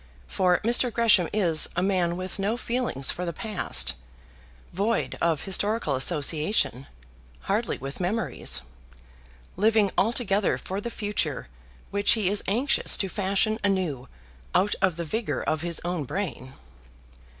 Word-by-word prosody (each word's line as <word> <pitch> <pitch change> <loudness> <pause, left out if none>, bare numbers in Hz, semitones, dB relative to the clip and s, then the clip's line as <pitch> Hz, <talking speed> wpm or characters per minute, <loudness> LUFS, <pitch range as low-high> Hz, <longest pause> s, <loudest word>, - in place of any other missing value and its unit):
For 180 - +2
Mr. 240 +2 +2
Gresham 220 -7 +4
is 175 -7 +4
a 180 - +1
man 180 -3 +1
with 185 +2 -6
no 210 +4 0
feelings 235 - 0
for 180 - -5
the 170 - -2
past, 160 - -1 0.8
void 210 +5 -1
of 165 -3 +1
historical 205 -3 0
association, 150 - +1 0.5
hardly 215 +4 -1
with 135 +1 -7
memories, 185 - -1 0.9
living 210 0 +3
altogether 210 -2 +1
for 195 +2 -5
the 235 - -4
future 205 - -2 0.4
which 200 0 +3
he 210 -5 +1
is 205 +1 +2
anxious 245 +8 +2
to 195 - -1
fashion 200 +3 0
anew 180 -10 -1 0.5
out 205 +2 +3
of 190 -3 +2
the 170 - -3
vigour 220 +7 -2
of 155 -1 -1
his 170 -1 -2
own 175 -4 -2
brain. 135 -7 -5
190 Hz, 135 wpm, -26 LUFS, 170-215 Hz, 0.9 s, Gresham